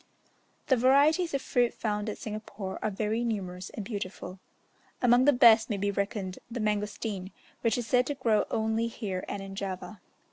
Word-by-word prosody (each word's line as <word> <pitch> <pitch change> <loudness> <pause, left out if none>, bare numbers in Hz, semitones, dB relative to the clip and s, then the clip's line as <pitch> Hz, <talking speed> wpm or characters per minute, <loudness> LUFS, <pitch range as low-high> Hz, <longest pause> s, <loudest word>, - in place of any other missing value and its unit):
The 260 - +4
varieties 285 +7 +4
of 275 - -2
fruit 245 -2 +1
found 210 -1 -2
at 210 - -5
Singapore 210 -3 -6
are 215 - 0
very 215 +3 -1
numerous 185 -5 -3
and 210 - -7
beautiful. 190 -3 -6 0.6
Among 245 0 +5
the 290 - +7
best 230 -4 +6
may 210 - -1
be 200 +1 0
reckoned 200 -2 -3
the 240 +1 -5
mangostan, 210 -2 -2 0.3
which 230 0 +1
is 245 - -2
said 250 +2 +2
to 290 - -2
grow 230 -5 +2
only 220 +1 0
here 195 -5 -4
and 200 -1 -4
in 195 0 -8
Java. 195 +1 -5
215 Hz, 175 wpm, -29 LUFS, 200-240 Hz, 0.6 s, the